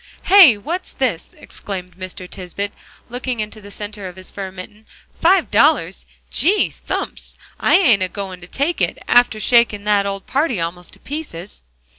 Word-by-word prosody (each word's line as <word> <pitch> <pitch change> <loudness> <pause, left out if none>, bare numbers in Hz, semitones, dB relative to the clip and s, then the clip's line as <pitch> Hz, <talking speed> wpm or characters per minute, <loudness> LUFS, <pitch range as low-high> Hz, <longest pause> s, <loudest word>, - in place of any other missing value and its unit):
"Hey 360 - +8
what's 340 - -5
this?" 230 -11 -2
exclaimed 185 -3 -7
Mr. 185 0 -8
Tisbett, 195 +2 -6 0.4
looking 245 0 -4
into 215 0 -5
the 205 - -12
center 205 -1 -7
of 180 - -10
his 185 0 -7
fur 195 -2 -6
mitten, 205 +4 -12 0.3
"five 370 +3 +2
dollars! - - +2 0.2
Gee 405 +5 +3
thumps! - - -5 0.2
I - - +4
ain't 250 - +5
a 185 - +1
goin' 190 -3 -6
to 175 - -10
take 290 - -1
it, - - +1
after 245 -3 +4
shaking 230 -3 +3
that 205 -1 +2
old 195 -1 -5
party 275 - 0
almost 170 +1 -5
to - - -14
pieces." 235 - -7
205 Hz, 165 wpm, -19 LUFS, 185-255 Hz, 0.4 s, Hey